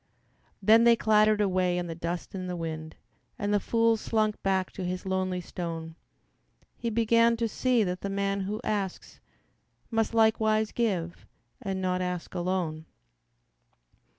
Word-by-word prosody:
Then 220 Hz, +3 st, +6 dB
they 235 Hz, 0 st, +7 dB
clattered 215 Hz, -1 st, +3 dB
away 185 Hz, -2 st, +1 dB
in 175 Hz, -, -2 dB
the 165 Hz, -, -5 dB
dust 170 Hz, +1 st, -5 dB
and 185 Hz, -1 st, -5 dB
the 180 Hz, -, -3 dB
wind, 160 Hz, -2 st, -5 dB, 0.4 s
And 205 Hz, 0 st, -1 dB
the 205 Hz, -, +4 dB
fool 230 Hz, +2 st, +2 dB
slunk 215 Hz, -1 st, 0 dB
back 190 Hz, -1 st, 0 dB
to 190 Hz, -, -6 dB
his 180 Hz, +1 st, -3 dB
lonely 185 Hz, -1 st, -1 dB
stone; 165 Hz, -2 st, -6 dB, 0.8 s
He 235 Hz, -, -3 dB
began 230 Hz, +1 st, +3 dB
to 230 Hz, 0 st, 0 dB
see 245 Hz, +1 st, +1 dB
that 180 Hz, -1 st, -3 dB
the 200 Hz, -, -3 dB
man 200 Hz, 0 st, -1 dB
who 200 Hz, +3 st, -3 dB
asks 200 Hz, -3 st, -3 dB, 0.7 s
Must 225 Hz, 0 st, 0 dB
likewise 220 Hz, -1 st, +3 dB
give 185 Hz, -8 st, -2 dB, 0.3 s
and 190 Hz, -1 st, -3 dB
not 180 Hz, 0 st, 0 dB
ask 180 Hz, -1 st, -4 dB
alone. 175 Hz, -3 st, -2 dB
195 Hz, 150 wpm, -28 LUFS, 180-220 Hz, 0.8 s, they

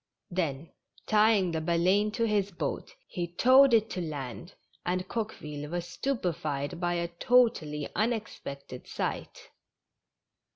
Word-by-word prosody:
Then, 165 Hz, -4 st, -2 dB, 0.3 s
tying 210 Hz, -4 st, +4 dB
the 160 Hz, -1 st, -1 dB
Baleine 180 Hz, +6 st, +2 dB
to 230 Hz, -, 0 dB
his 205 Hz, -3 st, +1 dB
boat, 200 Hz, -, -4 dB
he 175 Hz, -1 st, -3 dB
towed 255 Hz, +10 st, +6 dB
it 220 Hz, -2 st, +4 dB
to 180 Hz, -, -3 dB
land, 150 Hz, +2 st, -6 dB, 0.3 s
and 180 Hz, +1 st, -1 dB
Coqueville 150 Hz, -10 st, -5 dB
was 175 Hz, +1 st, -3 dB
stupe 225 Hz, -, -2 dB
fied 145 Hz, -2 st, -3 dB
by 175 Hz, -1 st, 0 dB
a 170 Hz, 0 st, -1 dB
totally 170 Hz, -, +2 dB
unexpected 205 Hz, -, -3 dB
sight. -, -, -4 dB
175 Hz, 125 wpm, -29 LUFS, 155-215 Hz, 0.3 s, towed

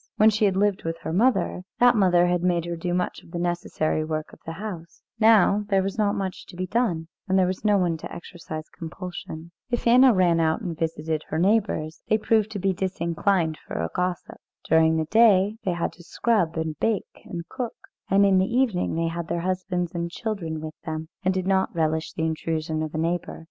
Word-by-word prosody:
When 215 Hz, +1 st, +6 dB
she 215 Hz, 0 st, +2 dB
had 190 Hz, -2 st, +2 dB
lived 205 Hz, -1 st, +1 dB
with 165 Hz, 0 st, -3 dB
her 160 Hz, -, -4 dB
mother, 225 Hz, -2 st, +2 dB, 0.2 s
that 245 Hz, 0 st, +6 dB
mother 180 Hz, -4 st, +4 dB
had 175 Hz, 0 st, +1 dB
made 175 Hz, -2 st, +1 dB
her 170 Hz, 0 st, -3 dB
do 175 Hz, +1 st, -3 dB
much 180 Hz, 0 st, -1 dB
of -, -, -18 dB
the 170 Hz, -, -5 dB
necessary 170 Hz, -3 st, -1 dB
work 155 Hz, 0 st, -4 dB
of -, -, -14 dB
the 165 Hz, -, -3 dB
house; 175 Hz, -3 st, -8 dB, 0.2 s
now 215 Hz, -2 st, +5 dB
there 195 Hz, -2 st, +3 dB
was 195 Hz, +3 st, -4 dB
not 205 Hz, -1 st, +2 dB
much 190 Hz, -2 st, -4 dB
to 180 Hz, -, -12 dB
be 185 Hz, +1 st, -2 dB
done, 185 Hz, -6 st, 0 dB, 0.2 s
and 190 Hz, 0 st, +2 dB
there 185 Hz, -, +4 dB
was 185 Hz, +2 st, -3 dB
no 210 Hz, -1 st, +4 dB
one 175 Hz, -3 st, +1 dB
to -, -, -8 dB
exercise 160 Hz, -3 st, -8 dB
compulsion. 170 Hz, -1 st, -7 dB, 0.2 s
If 240 Hz, -1 st, -2 dB
Anna 250 Hz, +2 st, +7 dB
ran 180 Hz, -5 st, +3 dB
out 160 Hz, -1 st, +2 dB
and 175 Hz, -6 st, -4 dB
visited 160 Hz, -1 st, -2 dB
her 155 Hz, -, -3 dB
neighbours, 190 Hz, -4 st, +1 dB
they 215 Hz, -, +4 dB
proved 220 Hz, 0 st, +2 dB
to -, -, -3 dB
be 195 Hz, 0 st, +1 dB
disinclined 175 Hz, -2 st, 0 dB
for -, -, -6 dB
a 80 Hz, 0 st, -2 dB
gossip. 180 Hz, -1 st, -2 dB, 0.3 s
During 160 Hz, 0 st, +4 dB
the 160 Hz, -, 0 dB
day 210 Hz, 0 st, +4 dB
they 185 Hz, -, +1 dB
had 170 Hz, -1 st, -2 dB
to 175 Hz, -, -15 dB
scrub 180 Hz, -4 st, 0 dB
and 160 Hz, -2 st, -3 dB
bake 220 Hz, -3 st, -2 dB
and 170 Hz, -4 st, -6 dB
cook, 245 Hz, -3 st, -5 dB, 0.3 s
and 200 Hz, +1 st, +5 dB
in 195 Hz, -1 st, +4 dB
the 190 Hz, +4 st, 0 dB
evening 235 Hz, -10 st, +1 dB
they 165 Hz, 0 st, 0 dB
had 170 Hz, 0 st, -4 dB
their 170 Hz, -, -2 dB
husbands 180 Hz, -1 st, -2 dB
and 170 Hz, -1 st, -2 dB
children 170 Hz, -6 st, -4 dB
with 155 Hz, 0 st, -6 dB
them, 160 Hz, 0 st, -5 dB
and 185 Hz, -, +2 dB
did 185 Hz, -1 st, -2 dB
not 190 Hz, -1 st, +1 dB
relish 160 Hz, -1 st, 0 dB
the 160 Hz, -, -1 dB
intrusion 160 Hz, 0 st, -2 dB
of 155 Hz, 0 st, -4 dB
a -, -, -1 dB
neighbour. 170 Hz, +2 st, -2 dB
180 Hz, 215 wpm, -25 LUFS, 165-200 Hz, 0.3 s, Anna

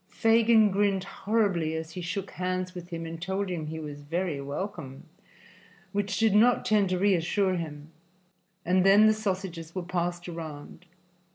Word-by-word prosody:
Fagin 225 Hz, -1 st, +4 dB
grinned 195 Hz, -1 st, +1 dB
horribly 195 Hz, -6 st, 0 dB
as 160 Hz, 0 st, -5 dB
he 180 Hz, -, -6 dB
shook 190 Hz, +3 st, -4 dB
hands 185 Hz, 0 st, -3 dB
with 175 Hz, -2 st, -9 dB
him 165 Hz, -2 st, -5 dB
and 165 Hz, 0 st, -7 dB
told 190 Hz, +2 st, -2 dB
him 165 Hz, -4 st, -3 dB
he 160 Hz, +1 st, -5 dB
was 145 Hz, -2 st, -7 dB
very 165 Hz, 0 st, -2 dB
welcome, 145 Hz, -2 st, -6 dB, 0.9 s
which 200 Hz, 0 st, -1 dB
did 220 Hz, -2 st, +3 dB
not 235 Hz, +4 st, +4 dB
tend 210 Hz, -3 st, +3 dB
to 185 Hz, -, 0 dB
reassure 190 Hz, 0 st, +2 dB
him, 155 Hz, -3 st, -6 dB, 0.7 s
and 185 Hz, +1 st, +3 dB
then 200 Hz, +2 st, +7 dB
the 215 Hz, -, +6 dB
sausages 185 Hz, -6 st, -4 dB
were 185 Hz, -, -2 dB
passed 175 Hz, 0 st, -3 dB
around. 165 Hz, 0 st, -8 dB
180 Hz, 160 wpm, -28 LUFS, 165-200 Hz, 0.9 s, then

